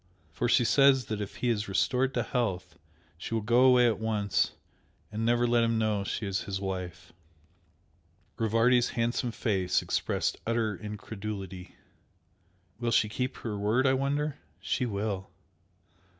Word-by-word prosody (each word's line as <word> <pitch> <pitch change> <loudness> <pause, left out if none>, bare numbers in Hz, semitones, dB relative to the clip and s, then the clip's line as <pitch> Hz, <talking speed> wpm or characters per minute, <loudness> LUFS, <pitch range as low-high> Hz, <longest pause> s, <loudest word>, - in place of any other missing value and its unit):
For 120 +10 -1
she 120 - +4
says 135 -1 +5
that 105 0 -4
if 100 - -6
he 125 - -1
is 110 -2 0
restored 125 +7 +1
to - - +1
health 95 -8 -2 0.4
she 115 - -4
will 110 - 0
go 120 +4 +4
away 125 -1 +6
at 115 -2 +1
once 105 -3 0 0.6
and 110 +1 -3
never 120 +1 +3
let 120 -1 +3
him 115 0 +1
know 110 -2 0
she 105 - -3
is 95 -1 -1
his 95 -1 -3
wife." 95 -3 -5 1.3
Rivardi's 115 +2 +3
handsome 120 +1 0
face 95 -6 0
expressed - - -1
utter 115 -3 0
incredulity. 100 -2 -7 1.0
"Will 120 -1 -1
she 110 -2 +3
keep 125 +4 -3
her 105 -3 -5
word 110 +6 +2
I 130 - +4
wonder?" 145 +2 -1 0.2
"She 125 - -1
will!" 100 -2 -3
110 Hz, 150 wpm, -29 LUFS, 100-120 Hz, 1.3 s, away